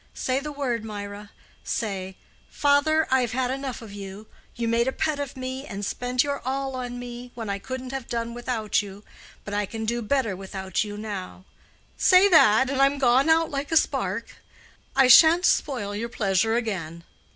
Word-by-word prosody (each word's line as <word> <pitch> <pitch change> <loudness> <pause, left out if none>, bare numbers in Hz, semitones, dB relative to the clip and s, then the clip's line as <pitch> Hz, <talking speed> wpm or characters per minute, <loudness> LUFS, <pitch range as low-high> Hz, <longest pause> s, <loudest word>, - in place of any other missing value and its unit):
Say 260 +1 0
the 300 +2 -6
word, 255 -6 -2
Mirah; 205 -1 -7 0.3
say, 190 -3 -3 0.3
'Father, 300 +2 +2
I've 250 -3 +2
had 255 0 0
enough 265 -3 -5
of 210 -3 -10
you; 200 +1 -8 0.3
you 235 -1 -2
made 230 +2 +2
a - - +2
pet 305 +1 -1
of 280 -1 -5
me, 260 +1 -5
and 200 0 -5
spent 250 +4 0
your 285 -1 -2
all 270 +1 -2
on 245 -1 -5
me, 245 0 -8
when 225 -4 -4
I 200 - -3
couldn't 255 +3 -6
have 270 -3 -5
done 235 0 -3
without 240 -4 -1
you; 200 0 -10 0.4
but 205 - -6
I 205 -1 0
can 225 +1 -5
do 235 +2 -1
better 230 -3 0
without 190 0 -3
you 205 -1 -7
now,'—say 210 - 0
that, 265 - +6
and 270 0 0
I'm 275 +1 +4
gone 265 +2 +3
out 325 0 +3
like 280 +1 -4
a 320 - +5
spark. - - -1 0.6
I 270 -1 +5
shan't 325 +7 +7
spoil 220 - 0
your 230 +3 -3
pleasure 215 0 +1
again." 175 -8 -3
240 Hz, 180 wpm, -25 LUFS, 205-270 Hz, 0.6 s, shan't